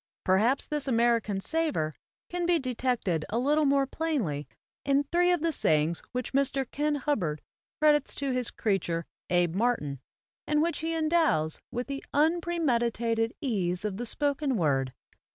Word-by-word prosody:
Perhaps 220 +9 +3
this 295 -2 -3
American 230 -4 +2
savor 290 - -1 0.3
can 350 0 -2
be 350 -1 +4
detected 245 - -1
a 220 - -1
little 295 +5 +2
more 275 -1 +3
plainly 260 - -2 0.4
in 280 0 +2
three 350 +4 +2
of 350 -3 +1
the 335 - +2
sayings 155 - +1
which 250 0 -4
Mr. 275 0 +1
Kin 295 +1 0
Hubbard 210 - -1 0.4
credits 295 -2 +3
to 275 -1 -2
his 250 -2 0
creature, 175 -6 -1 0.2
Abe 175 -2 +2
Martin, 190 - 0 0.5
and 300 0 +2
which 335 +2 0
he 325 +1 -2
endows 310 - +2
with 245 +1 -3
the 275 0 -5
unpremeditated 245 -9 +1
ease 195 -7 -1
of 200 -2 -2
the 240 +1 -4
spoken 285 -1 0
word. 135 -6 +1
255 Hz, 150 wpm, -28 LUFS, 195-300 Hz, 0.5 s, be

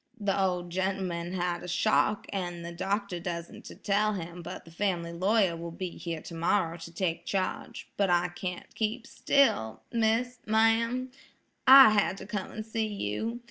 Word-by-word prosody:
"The 200 -2 0
ol' 185 -2 +1
gent'man's 180 -1 -2
had 175 0 -2
shock, 215 +2 +2
an' 175 -3 -3
the 170 - -6
doctor 195 +1 -2
dassent 170 -1 -6
to - - -9
tell 210 +1 +1
him, 175 -2 -6
but 170 - -8
the 165 - -14
family 170 -2 -1
lawyer 190 0 +2
will 170 +1 -6
be 180 +2 -5
here 165 -2 -6
tomorrow 165 0 0
to 165 0 -9
take 170 -1 -2
charge; 230 +6 -3
but 200 -2 +2
I 175 0 +3
can't 180 0 -6
keep 225 +2 -2
still, 110 - +1
miss,–ma'am–I 230 +3 +3
had 205 -2 +2
to 195 - -8
come 205 -1 -4
an' 215 - -5
see 220 0 -2
you. 210 - -3
190 Hz, 155 wpm, -29 LUFS, 170-215 Hz, -, I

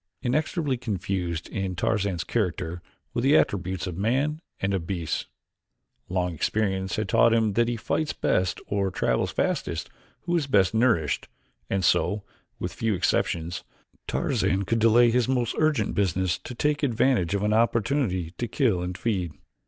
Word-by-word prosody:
Inextricably 145 +1 0
confused 90 -7 -3
in 95 -2 -3
Tarzan's 100 -3 0
character 90 -5 -2 0.3
were - - 0
the 140 +5 +5
attributes 95 -3 0
of 90 0 -5
man 140 +9 0 0.2
and 95 +1 0
of 85 -4 -2
beasts. 85 -5 -2 0.8
Long 90 -1 0
experience 95 +2 -1
had 110 -1 -2
taught 115 +4 +4
him 110 -3 +2
that 115 +3 +2
he 120 -1 -1
fights 155 +8 -1
best 90 0 0
or 100 -1 0
travels 95 - 0
fastest - - -2 0.3
who 175 0 -1
is 155 -5 0
best 100 -7 +3
nourished, 110 - +2 0.4
and 95 -2 0
so, 100 +7 +2 0.3
with - - -4
few 110 -3 0
exceptions, 85 -1 0 0.4
Tarzan 95 +3 0
could 115 +4 0
delay 115 +1 +5
his 125 -1 +2
most 125 -3 0
urgent 150 -9 +2
business 95 -2 0
to 125 - -8
take 150 +3 0
advantage 120 - +2
of 100 - -1
an 105 0 +2
opportunity 115 - +1
to 120 - -1
kill 110 - +1
and 90 +1 -4
feed. 95 -8 -1
105 Hz, 155 wpm, -26 LUFS, 90-120 Hz, 0.8 s, the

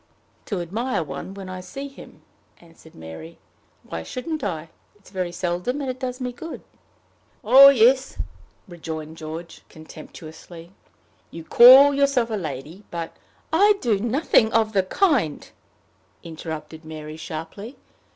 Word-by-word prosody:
"To 195 -4 -2
admire 215 +4 -2
one 150 +6 -7
when 195 -1 -8
I 185 0 -7
see 275 +10 -7
him," 275 - -15 0.3
answered 165 -1 -19
Mary. 80 0 -10 0.5
"Why 80 - -6
shouldn't 295 - -5
I? 165 -5 -4 0.3
It 205 - -29
is - - -17
very 185 -3 -3
seldom, 180 +9 -2
and 270 -3 -2
it 255 - -11
does 255 -1 -4
me 250 -1 -3
good." 325 +7 -8 0.8
"Oh, 265 +5 +9
yes!" 260 +1 +3 0.5
rejoined 160 -3 -7
George, 165 +1 -8
contemptuously. 160 +2 -12 0.6
"You 165 - -9
call 260 - +8
yourself 275 -4 +1
a - - 0
lady, 155 +1 -6
but 170 -1 -6 0.2
" - - -34
"I 415 +1 +5
do 220 - +1
nothing 235 -1 +2
of 220 -1 +2
the 195 - +4
kind," 225 - 0 0.8
interrupted 160 -1 -8
Mary, 155 -1 -8
sharply. 165 - -8
185 Hz, 140 wpm, -23 LUFS, 160-250 Hz, 0.8 s, Oh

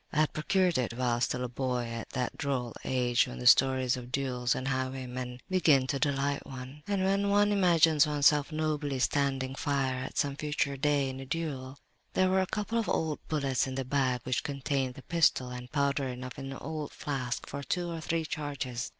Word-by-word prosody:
I 155 - +2
had 155 - +1
procured 180 +1 +2
it 120 -2 -1
while 120 -2 +1
still 125 0 0
a - - -1
boy, 125 0 -2
at 115 -1 -6
that 125 -1 -2
droll 130 -4 -2
age 125 -2 +2
when 60 - -7
the 60 - -6
stories 130 - +5
of 125 -1 -8
duels 125 -2 0
and 130 - -3
highwaymen 130 -1 -3
begin 155 -8 +4
to 135 +1 -1
delight 140 0 0
one, 130 +2 -9
and 200 -2 0
when 200 +1 +2
one 205 +1 +4
imagines 165 -6 +5
oneself 150 0 +3
nobly 155 -3 -1
standing 135 0 0
fire 135 -2 -1
at - - -7
some 140 -1 0
future 145 -2 -1
day, 145 0 +1
in 130 0 -5
a 135 - -7
duel. 140 -4 -4 0.4
"There 185 0 +3
were 190 0 +4
a 185 - -1
couple 210 +4 -1
of 225 - -2
old 155 -2 0
bullets 140 -3 0
in 130 - -4
the 135 -1 -2
bag 130 -2 +1
which 125 -1 0
contained 135 -2 -2
the 135 - -11
pistol, 160 -7 +2
and 125 0 -8
powder 140 -1 +1
enough 125 +1 -6
in 135 - -6
an 135 - -6
old 155 -2 -5
flask 130 -4 -3
for 140 - -6
two 175 +4 -2
or 165 -1 -5
three 165 0 -1
charges. 140 -5 -4
140 Hz, 200 wpm, -30 LUFS, 130-155 Hz, 0.4 s, stories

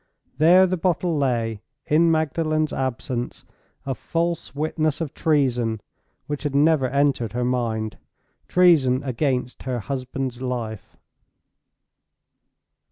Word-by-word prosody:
There 175 +4 +7
the 185 0 -1
bottle 175 -1 0
lay, 115 -6 0 0.2
in 165 +3 +4
Magdalen's 155 0 0
absence, 125 -1 -3 0.4
a 135 - -1
false 165 +1 -3
witness 155 0 -1
of 160 -3 -4
treason 125 -8 +1 0.5
which 145 -1 -4
had 145 -2 -3
never 145 -2 +4
entered 140 -4 +1
her 125 0 -1
mind—treason 125 +5 +1
against 130 -1 -1
her 125 -1 -3
husband's 130 +2 -4
life! 115 -5 -5
135 Hz, 100 wpm, -23 LUFS, 125-155 Hz, 0.5 s, There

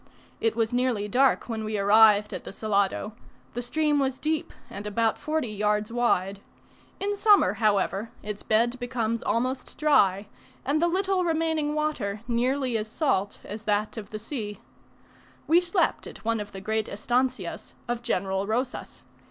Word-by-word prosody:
It 225 -1 +1
was 230 +1 0
nearly 245 -4 +1
dark 260 +5 +3
when 225 -2 -3
we 215 0 -2
arrived 210 +1 +5
at - - -5
the - - -8
Salado; 200 0 0 0.4
the 245 - -3
stream 295 +4 +1
was 265 -1 0
deep, 310 +1 -1 0.2
and 205 +1 -7
about 220 +2 +1
forty 310 -6 -1
yards 210 +1 0
wide; 200 -5 +1 0.6
in 405 +1 -1
summer, 405 - +5
however, 205 0 +1
its 210 0 -5
bed 235 +3 +1
becomes 230 -2 -2
almost 255 +3 -2
dry, 205 -10 +3 0.4
and 295 +3 +1
the 345 - +4
little 380 +1 +1
remaining 320 -3 0
water 245 -10 -2
nearly 250 0 +1
as 215 - -4
salt 215 - -1
as 210 +2 -7
that 210 0 0
of 215 -3 -7
the 215 - -5
sea. 215 -2 -5 0.9
We 340 +2 +5
slept 355 +1 0
at - - -11
one 230 0 +1
of 205 0 -6
the 195 - -8
great 220 +2 -1
estancias 245 +5 -2
of 240 0 -2
General 195 -4 -1
Rosas. 245 +4 -3
230 Hz, 160 wpm, -26 LUFS, 210-275 Hz, 0.9 s, arrived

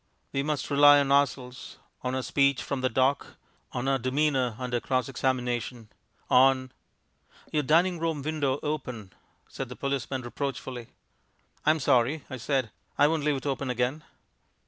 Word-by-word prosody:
We 135 - +1
must 150 0 -2
rely 145 0 +7
on 140 -1 0
ourselves; 135 -2 0 0.2
on 125 0 -2
our 130 - -2
speech 140 +2 +2
from 140 -2 -3
the 130 - +1
dock; 130 +4 0 0.3
on 125 +1 -3
our 135 -1 +2
demeanour 130 -2 +1
under 125 -1 -2
cross 130 0 -1
examination; 125 -3 -2 0.4
on 130 0 +4 0.8
"Your 150 - +1
dining 170 +5 +3
room 160 -3 -2
window 145 -3 -1
open," 125 - -4 0.3
said 135 -2 -6
the 125 - -7
policeman 135 -1 -3
reproachfully. 125 -1 -5 0.8
"I'm 155 +1 +4
sorry," 130 +3 +2
I 130 - -4
said; 130 -2 -1 0.3
"I 145 - +5
won't 155 -1 0
leave 150 -1 +2
it 135 - -8
open 135 -1 -2
again." 125 +5 -1
135 Hz, 150 wpm, -27 LUFS, 125-145 Hz, 0.8 s, rely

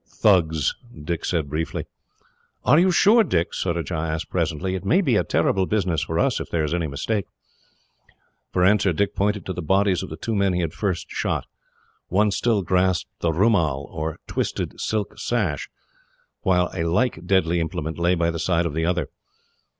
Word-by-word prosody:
"Thugs," 80 -8 +2 0.3
Dick 85 +1 -3
said 80 -5 -1
briefly. 80 +3 -3 0.8
"Are 150 - +6
you 185 +2 +4
sure, 210 +6 +5
Dick?" 85 - 0
Surajah 85 -1 -2
asked 80 0 -3
presently. 95 +5 -1
"It 95 - -3
may 180 - +3
be 135 - +2
a - - +3
terrible 95 -1 +1
business 90 -7 0
for 80 - -2
us, - - +2
if - - -6
there 80 -2 0
is 75 +1 -1
any 85 -2 0
mistake." 95 +9 -2 1.2
For 90 -1 +2
answer, 100 -2 +3
Dick 100 +4 0
pointed 100 -2 0
to 95 - -3
the 90 - -5
bodies 95 +2 +2
of - - -6
the 80 - -7
two 115 - -3
men 100 -2 +2
he 90 - 0
had 80 -3 -2
first 95 -5 -3
shot. - - -1 0.6
One 105 +3 +2
still 110 -1 +1
grasped 90 -1 0
the 85 - 0
roomal, 80 -7 +2
or 80 0 -4
twisted - - -3
silk 105 -2 -2
sash, 100 - -1 0.7
while 90 -1 +2
a 90 - -3
like 90 0 0
deadly 90 -3 +2
implement 80 0 -3
lay 85 +1 +3
by 85 -1 +1
the 85 - -5
side 85 0 +1
of 80 - -2
the 80 +2 0
other. 85 -4 0
90 Hz, 180 wpm, -23 LUFS, 80-100 Hz, 1.2 s, Are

